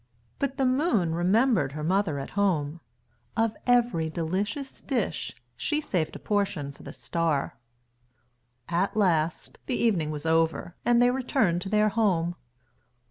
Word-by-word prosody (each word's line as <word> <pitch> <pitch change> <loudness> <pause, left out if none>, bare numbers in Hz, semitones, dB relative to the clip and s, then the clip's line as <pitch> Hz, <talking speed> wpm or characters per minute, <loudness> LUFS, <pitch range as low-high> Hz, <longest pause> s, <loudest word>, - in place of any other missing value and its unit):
But 275 -1 -1
the 270 - +2
Moon 255 - +2
remembered 185 - +2
her 150 0 -5
mother 185 -2 +1
at 135 - -6
home. 170 -6 0 0.6
Of 225 -1 +1
every 240 -10 +3
delicious 195 - -3
dish 260 -4 -2 0.2
she 300 -1 -1
saved 180 - -2
a - - -4
portion 195 -9 -1
for 140 - -17
the - - -8
Star. 165 -5 -2 1.1
At 180 +5 0
last 170 -5 +1
the 255 - 0
evening 185 -10 +1
was 150 0 -5
over 165 +1 +1
and 240 0 +4
they 245 - +5
returned 250 -9 +1
to 190 - -5
their 215 +1 +3
home. 190 -6 +1
190 Hz, 140 wpm, -27 LUFS, 165-235 Hz, 1.1 s, they